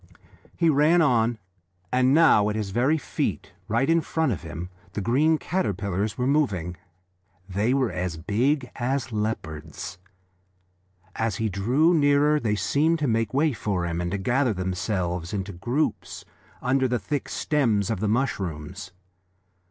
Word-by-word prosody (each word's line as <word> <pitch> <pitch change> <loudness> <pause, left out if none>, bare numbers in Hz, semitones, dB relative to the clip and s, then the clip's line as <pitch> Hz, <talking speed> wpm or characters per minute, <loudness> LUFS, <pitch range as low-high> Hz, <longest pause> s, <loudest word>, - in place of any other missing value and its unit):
He 170 - +2
ran 155 +3 +4
on, 120 -4 +2 0.6
and 130 +1 +4
now 140 -9 +5
at 105 - -2
his 105 -3 -3
very 130 +9 +2
feet, 100 - -3 0.2
right 115 +4 +1
in 165 +1 +3
front 160 -2 0
of 100 - -3
him, 85 +1 -7 0.2
the - - -3
green 140 +10 +3
caterpillars 100 - -2
were 125 - 0
moving. 105 - 0 0.7
They 105 +7 +1
were 130 -4 +1
as 90 -2 -3
big 125 - 0
as 130 +1 -1
leopards. 90 -5 -4 1.2
As 110 -3 0
he 110 +2 -1
drew 125 - +2
nearer 145 -1 +4
they 110 -6 0
seemed 145 - +1
to 150 -3 -1
make 115 -2 0
way 150 +2 +2
for 100 -5 -2
him, 85 0 -2
and 90 - -2
to 100 - -2
gather 120 +5 +1
themselves 90 -1 -2
into 100 0 -3
groups 120 - -2 0.4
under 130 +1 +2
the 125 0 0
thick 145 +4 -3
stems 115 -9 +1
of 110 - -2
the 105 - 0
mushrooms. 95 - -3
115 Hz, 150 wpm, -25 LUFS, 95-140 Hz, 1.2 s, now